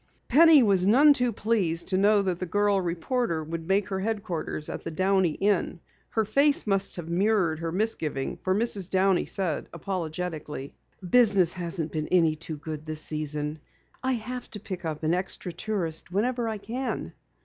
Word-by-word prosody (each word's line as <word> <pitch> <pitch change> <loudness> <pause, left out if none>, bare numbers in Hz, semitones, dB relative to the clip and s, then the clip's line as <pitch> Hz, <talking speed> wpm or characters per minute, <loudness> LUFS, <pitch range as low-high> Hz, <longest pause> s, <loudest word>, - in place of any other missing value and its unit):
Penny 310 0 +7
was 195 -3 +3
none 285 +8 +7
too 250 -3 +1
pleased 200 -7 0
to 190 - 0
know 205 +1 +4
that 180 -2 -2
the 185 - -4
girl 205 +2 +2
reporter 170 +1 -2
would 165 +1 -6
make 195 +1 +1
her 190 -1 -2
headquarters 190 -7 -3
at - - -6
the - - -4
Downey 185 0 +1
Inn. 195 -2 0 0.3
Her 220 -1 0
face 280 +7 +4
must 195 -2 0
have 175 -3 -7
mirrored 175 -2 +1
her 165 0 -3
misgiving, 165 -9 -2
for 185 0 +1
Mrs. 205 -4 +1
Downey 190 -1 +2
said 180 -6 -2
apologetically: 165 -5 -5 0.3
"Business 200 -5 +5
hasn't 170 -3 -3
been 155 -1 -3
any 165 -4 +3
too 160 0 -5
good 155 0 -7
this 155 0 -3
season. 150 0 -2 0.4
I 260 0 0
have 245 +1 -5
to 210 - -6
pick 185 -3 -7
up 155 -1 -4
an 155 +2 +1
extra 180 0 -3
tourist 170 -4 -3
whenever 235 +5 0
I 220 - -3
can." 235 +6 -4
185 Hz, 170 wpm, -26 LUFS, 165-215 Hz, 0.4 s, Penny